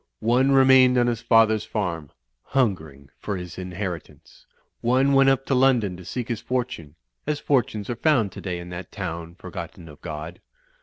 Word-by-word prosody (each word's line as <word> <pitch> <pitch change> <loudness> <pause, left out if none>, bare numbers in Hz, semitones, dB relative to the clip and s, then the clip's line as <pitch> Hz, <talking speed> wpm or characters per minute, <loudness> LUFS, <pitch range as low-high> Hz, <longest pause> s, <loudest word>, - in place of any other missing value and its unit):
One 125 +4 +2
remained 130 -1 +6
on 120 - +4
his 120 -1 -1
father's 110 -2 +4
farm, 85 -8 -3 0.3
hungering 80 - -2
for 100 -2 -3
his 90 0 -8
inheritance. 90 -5 -7 0.3
One 130 +4 +3
went 135 0 +6
up 135 0 +1
to - - 0
London 125 -7 +3
to 90 - -12
seek 120 +6 -4
his 115 -3 -3
fortime, 120 - -4 0.3
as 150 -1 -1
fortunes 115 -7 0
are 120 - -3
found 120 -6 +2
today 90 -1 -5
in 85 0 -8
that 90 +1 -8
town 85 -4 -6
forgotten 85 - -9
of 75 -2 -14
Grod. 75 +3 -7
110 Hz, 165 wpm, -24 LUFS, 85-130 Hz, 0.3 s, remained